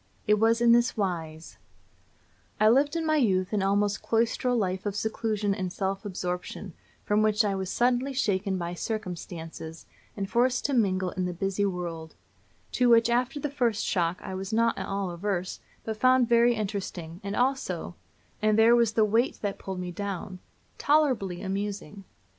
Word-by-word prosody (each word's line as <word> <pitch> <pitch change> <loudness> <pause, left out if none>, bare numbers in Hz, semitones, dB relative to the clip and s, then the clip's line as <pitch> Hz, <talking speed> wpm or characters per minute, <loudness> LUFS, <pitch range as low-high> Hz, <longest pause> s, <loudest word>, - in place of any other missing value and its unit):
It 210 0 +3
was 225 +1 +3
in 235 -1 +5
this 240 +1 +3
wise: 165 -5 -4 1.0
I 215 +1 +6
lived 285 +6 +3
in 330 -1 -1
my 310 0 +2
youth 190 -7 +1
an 205 - +1
almost 200 +1 +1
cloistral 235 +2 +1
life 190 -2 -1
of 200 - -3
seclusion 215 -1 -1
and 185 -3 -3
self 195 +2 -3
absorption, 180 0 -5 0.3
from 210 +1 +2
which 215 0 +3
I 200 - +1
was 190 -1 -3
suddenly 250 +4 +1
shaken 200 -7 0
by 170 -1 -4
circumstances, 170 -5 -6 0.3
and 195 -1 -2
forced 245 +4 +1
to 285 - 0
mingle 190 -6 +1
in 185 -1 -2
the 180 - -3
busy 195 +2 0
world; 170 -4 -5 0.6
to 250 -1 +2
which, 230 0 +5
after 250 +4 0
the 290 0 -3
first 240 -6 0
shock, 175 -1 0
I - - -6
was 190 +2 -5
not 230 +1 +2
at 190 0 -5
all 195 -2 -2
averse, 185 +1 -3 0.2
but 220 -1 -4
found 255 +1 +4
very 235 0 +4
interesting, 195 -5 -5
and 200 +1 -3
also 265 +2 -1 0.5
and 215 0 +3
there 225 +2 +6
was 235 -2 +3
the 220 -1 +4
weight 225 +5 +1
that 200 -1 -2
pulled 190 -1 -5
me 180 -1 -4
down 190 0 -5 0.4
tolerably 260 - +1
amusing. 195 -2 -4
205 Hz, 170 wpm, -27 LUFS, 185-235 Hz, 1.0 s, I